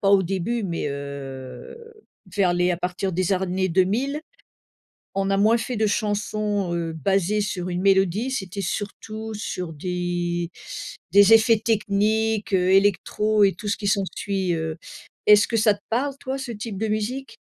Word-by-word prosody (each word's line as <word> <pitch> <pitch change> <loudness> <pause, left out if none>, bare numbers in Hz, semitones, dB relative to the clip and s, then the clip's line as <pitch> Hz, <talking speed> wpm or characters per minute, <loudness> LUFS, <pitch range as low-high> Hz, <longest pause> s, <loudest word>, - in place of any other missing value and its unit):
pas 195 - +3
au 195 -1 +6
début 195 +6 -2
mais, 170 -5 -2
heu, 135 - -7 0.6
vers 185 -4 +3
les 180 0 +2
à 175 - 0
partir 180 +2 -2
des 185 +2 0
années 185 0 0
2000, 220 - +1 1.0
on 195 0 0
a 195 - +2
moins 220 +3 +4
fait 230 +1 -3
de 215 0 +2
chansons, 205 -2 -1
heu, 165 -1 -2
basées 195 +5 +1
sur 185 -2 -3
une 175 +1 -2
mélodie, 195 +4 +3
c'était 200 -6 -4
surtout 215 +4 -5
sur 180 -5 -4
des 175 +1 -2 0.6
des 200 +3 +7
effets 225 0 +6
techniques, 215 0 +1
heu, 185 0 +3
électro 205 +2 +3
et 195 - +2
tout 205 +4 -8
ce - - 0
qui 205 -2 -3
s'ensuit, 195 -2 0
heu. 160 -1 -3 0.5
Est-ce 210 0 +8
que 230 - 0
ça 215 -1 +4
te 205 - -13
parle, 270 +4 0
toi, 265 0 -3
ce 265 -2 -5
type 210 -1 -6
de 220 +3 -1
musique? 220 +6 -3
200 Hz, 165 wpm, -24 LUFS, 180-215 Hz, 1.0 s, Est-ce